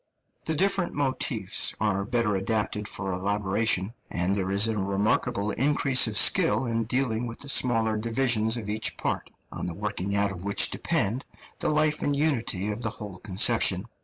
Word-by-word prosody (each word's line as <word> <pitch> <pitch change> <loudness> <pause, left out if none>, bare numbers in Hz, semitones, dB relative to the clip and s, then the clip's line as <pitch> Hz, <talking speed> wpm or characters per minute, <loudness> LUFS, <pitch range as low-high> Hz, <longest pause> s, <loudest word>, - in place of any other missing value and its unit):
The 160 - -1
different 190 +1 +1
motifs 130 -7 +1
are 100 -2 0
better 115 -2 0
adapted 105 +1 -2
for 100 -3 -1
elaboration, 100 +2 0 0.2
and 90 +3 0
there 95 -2 -2
is 100 +3 +3
a 110 - -1
remarkable 105 +2 0
increase 135 -1 +3
of 105 -1 -1
skill 165 - +4
in 115 -1 -1
dealing 120 -1 -1
with 115 - -8
the 140 - -7
smaller 115 -5 +2
divisions 115 0 +1
of 110 -3 -6
each 110 +1 -1
part, - - -3 0.2
on - - -5
the 85 - -5
working 100 -1 -3
out 100 0 +1
of 90 -2 -7
which 100 0 +3
depend 115 +7 -1 0.3
the - - +1
life 155 0 +2
and 145 - 0
unity 120 -9 0
of 105 +3 -6
the 110 - -1
whole 105 -4 -8
conception. 100 -1 +2
110 Hz, 170 wpm, -26 LUFS, 100-125 Hz, 0.3 s, skill